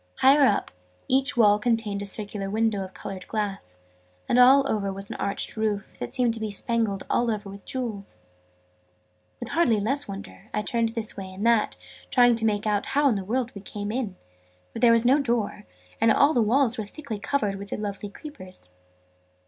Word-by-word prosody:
Higher 275 +1 +5
up, 205 - 0 0.4
each 270 +1 +2
wall 210 -2 +5
contained 225 -3 0
a 200 - 0
circular 200 -1 -1
window 220 -1 0
of 190 - -9
coloured 190 0 -8
glass; 195 - -4 0.5
and 245 - +3
over 250 -5 +5
all 195 - -2
was 195 0 -8
an - - -5
arched 200 0 -3
roof, 215 -3 -3
that 120 - -5
seemed 245 -2 +1
to 225 - -5
be 220 -1 -3
spangled 210 -1 0
all 240 0 +1
over 205 -3 -3
with 200 0 -12
jewels. 220 - -5 1.2
With 240 - -6
hardly 260 -11 +2
less 270 +8 -1
wonder, 200 +1 -9
I 210 - 0
turned 230 0 +1
this 225 -2 0
way 190 -2 -7
and 195 +4 -5
that, 230 -2 +2 0.3
trying 245 -2 +5
to 225 - 0
make 210 -1 0
out 210 -1 0
how 285 0 +3
in 235 - +1
the 195 - -3
world 240 +4 -1
we 200 - -8
had 195 - -11
come 205 0 -4
in: 225 -5 -3 0.6
for - - -5
there 240 - +6
was 230 0 +3
no 265 +4 +5
door: 230 -6 -1 0.3
and 225 - +5
all 290 +2 +4
the 240 - +3
walls 240 +2 +2
were 215 - -2
thickly 225 -1 -7
covered 205 -4 -1
with 200 0 -9
the - - -3
lovely 205 -1 -5
creepers. 185 - -12
220 Hz, 200 wpm, -25 LUFS, 200-245 Hz, 1.2 s, there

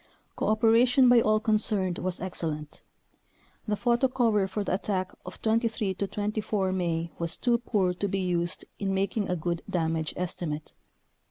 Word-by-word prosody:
Cooperation 235 +4 +4
by 245 -1 +7
all 215 0 +3
concerned 210 -4 +1
was 185 -1 -2
excellent. 155 -5 -4 0.9
The 210 - +1
photo 240 +4 +2
cover 225 -6 +2
for 200 +2 -3
the - - -1
attack 185 -1 -1 0.2
of - - -8
23 220 -3 +1
24 205 0 -1
May 170 -3 -1
was 170 -1 -1
too 240 -1 +2
poor 200 -6 +1
to 200 +3 -2
be 195 - -1
used 175 -2 -1
in 195 -1 -1
making 200 +2 -1
a 180 - +1
good 170 0 -2
damage 160 -2 -1
estimate. 165 -4 -4
195 Hz, 150 wpm, -28 LUFS, 180-220 Hz, 0.9 s, by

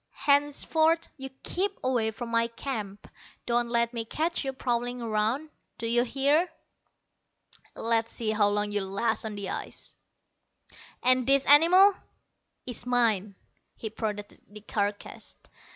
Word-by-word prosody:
Henceforth 315 +3 +2
you 270 -2 -7
keep 390 +2 -1
away 245 -4 +1
from 230 +2 -7
my 230 0 +1
camp. 220 -4 -6 0.4
Don't 240 0 0
let 235 0 +1
me 230 -1 -2
catch 320 +10 -2
you 270 - -2
prowling 245 -1 -2
around, 230 +7 -1 0.3
d'you 235 +1 +1
hear? 280 +7 +1 1.3
Let's 230 0 +1
see 220 -2 -1
how 210 -1 +3
long 205 0 0
you'll 200 -2 -2
last 220 +4 -1
on 215 -1 -5
the 200 -2 -4
ice!" - - -6 1.1
"This 255 +2 +5
animal 355 +7 +7 0.7
is 245 -1 -4
mine." 220 -5 +1 0.4
He 220 - -6
prodded 210 -2 -5
the 210 +1 -12
carcass. 205 -1 -4
235 Hz, 125 wpm, -27 LUFS, 215-275 Hz, 1.3 s, animal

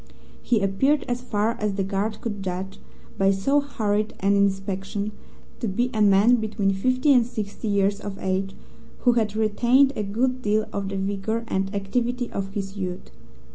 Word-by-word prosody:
He 230 -4 +1
appeared, 265 +10 +2
as 245 -1 -2
far 215 -2 0
as 210 -2 -1
the 195 - 0
guard 200 +3 -2
could 205 -4 -4
judge 190 +1 -4 0.4
by 195 0 +4
so 195 +10 +2
hurried 215 -7 -1
an 200 +1 +3
inspection, 200 +1 -1 0.5
to 235 - -2
be 240 +6 0
a 215 - 0
man 205 +4 +5
between 215 -3 0
fifty 255 +8 +2
and 250 -2 +5
sixty 220 -2 -5
years 200 0 +2
of 205 -2 -6
age, 190 +1 -2 0.5
who 245 - +5
had 220 -3 0
retained 240 +6 +3
a - - -1
good 250 +6 -1
deal 215 -1 +1
of 200 -1 -2
the 195 - -3
vigour 200 +4 -2
and 195 +1 -1
activity 240 +5 -1
of 195 0 -4
his 195 -1 -4
youth. 185 -2 -5
205 Hz, 175 wpm, -24 LUFS, 195-235 Hz, 0.5 s, man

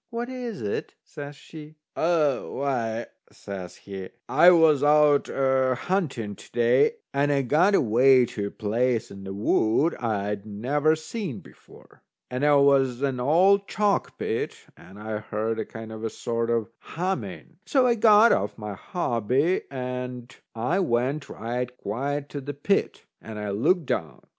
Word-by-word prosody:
"What 235 +1 -4
is 245 -5 -6
it?" 100 - -4
says 145 0 -9
she. 155 +1 -12 0.2
"A 160 -5 +2
why," 120 -4 -2 0.3
says 95 -3 -8
he, 95 -2 -8 0.2
"I 160 +6 +6
was 160 -5 +5
out 150 0 +4
a 130 -1 +1
hunting 135 - -2
to - - -15
day, 120 - +3 0.2
and 145 +1 +1
I 140 -1 +1
got 165 - +3
away 125 - +5
to 100 -3 -4
a - - -5
place 115 +3 -1
in 100 0 -10
the 95 - -6
wood 110 +9 +2
I'd 105 -3 -2
never 135 +9 0
seen 160 - -5
before. - - -19 0.3
And 125 +2 -3
there 145 -1 +5
was 135 -2 +3
an 135 -3 -1
old 185 +9 +3
chalk 205 -1 0
pit. - - -2 0.2
And 95 +2 -15
I 105 0 -4
heard 110 +1 -3
a - - -2
kind 110 0 -9
of 110 0 -8
a 115 - -1
sort 115 +1 -3
of 115 -1 -1
humming. 185 +3 -5
So 265 -4 +3
I 245 - +4
got 220 0 +6
off - - 0
my 105 -2 -6
hobby, 130 - 0
and 125 -1 -6 0.2
I 125 +12 0
went 135 -2 -1
right 120 +2 -4
quiet 140 +7 -3
to 145 - -6
the 145 +1 -6
pit, 195 +8 -1 0.2
and 110 -1 -9
I 105 -1 -4
looked 155 - +1
down. 80 - -3
130 Hz, 160 wpm, -25 LUFS, 115-155 Hz, 0.3 s, I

